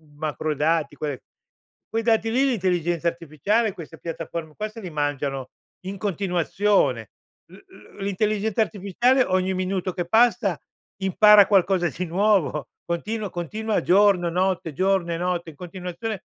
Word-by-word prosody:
macro 155 0 -2
dati, 150 0 0
quelle 145 -4 -4 0.7
quei 225 0 -1
dati 225 -1 +2
lì, 255 +4 +2
l'intelligenza 175 - 0
artificiale, 170 - 0
queste 160 -2 -10
piattaforme 165 -1 -6
qua 215 - -2
se 225 +1 -11
li 185 - -6
mangiano 145 -3 -2 0.3
in 195 +1 -5
continuazione. 185 - 0 0.4
L - - -13
l 105 - -18
l'intelligenza 210 +2 0
artificiale 220 +6 +2
ogni 185 -2 0
minuto 185 0 -2
che 175 -1 -3
passa 225 -4 +3 0.4
impara 205 +2 +7
qualcosa 190 -3 +3
di 180 +4 -4
nuovo, 175 -5 +1 0.2
continua 205 +5 -3
continua 215 +6 -2
giorno, 190 -2 +4
notte, 180 -2 -1
giorno 185 +1 +1
e - - -2
notte 175 -1 -2
in - - -20
continuazione 180 +4 -6
185 Hz, 135 wpm, -24 LUFS, 165-210 Hz, 0.7 s, impara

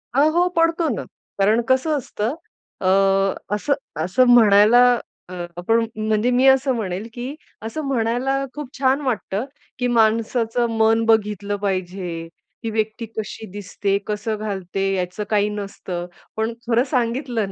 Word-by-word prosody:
हां, 290 +3 +5
हो 350 +2 +3
पडतो 330 0 +2
ना. - - -4 0.4
कारण 215 +4 +4
कसं 280 +4 +2
असतं 240 0 -3 0.5
अ, 185 - 0 0.7
असं 280 +7 0 0.3
असं 220 +8 +3
म्हणायला 220 +1 +7 0.5
अ, - - -8 0.2
आपण 225 +6 +2
म्हणजे 215 +2 +1
मी 250 +2 +3
असं 265 0 +4
म्हणेल, 200 -1 -3
की 250 +4 -5 0.3
असं 270 +8 -4
म्हणायला 245 +1 0 0.2
खूप 295 -3 -6
छान 270 +1 +2
वाटतं, 230 -4 -2 0.3
की 250 - +1
माणसाचं 230 +1 +2
मन 225 +1 +4
बघितलं 210 -2 +1
पाहिजे. 185 -4 -3 0.4
ती 225 - -2
व्यक्ती 220 +1 -2
कशी 220 +1 -5
दिसते, 200 0 -2
कसं 215 +1 -2
घालते, 195 -3 -3
याचं 180 +2 -3
काही 210 -1 +2
नसतं. 195 -4 -5 0.3
पण 220 +1 -1
खरं 240 +1 +3
सांगितलं 245 -2 0
225 Hz, 135 wpm, -21 LUFS, 205-250 Hz, 0.7 s, म्हणायला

